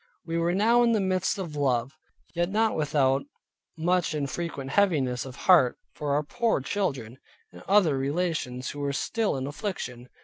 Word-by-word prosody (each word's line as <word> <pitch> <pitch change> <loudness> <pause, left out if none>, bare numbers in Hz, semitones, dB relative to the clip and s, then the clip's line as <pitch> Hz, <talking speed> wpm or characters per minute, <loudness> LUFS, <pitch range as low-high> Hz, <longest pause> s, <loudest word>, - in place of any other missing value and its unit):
We 165 0 -2
were 170 +1 +1
now 230 +4 +4
in 235 -1 +4
the 220 - +2
midst 185 -1 0
of 170 -6 -5
love, 135 -1 0 0.4
yet 175 +1 0
not 220 +2 +1
without 140 -3 +2 0.6
much 175 0 +1
and 145 -2 -1
frequent 140 -2 -5
heaviness 140 -11 +1
of 125 - -9
heart 170 -10 +4 0.2
for 145 -2 -2
our 150 - +1
poor 235 +6 0
children, 135 - -3 0.3
and - - -13
other 185 -9 +4
relations, 140 -4 -2
who 145 - -8
were 140 -1 -1
still 220 +3 -1
in 130 - -3
affliction. 135 - -5
155 Hz, 170 wpm, -27 LUFS, 135-185 Hz, 0.6 s, now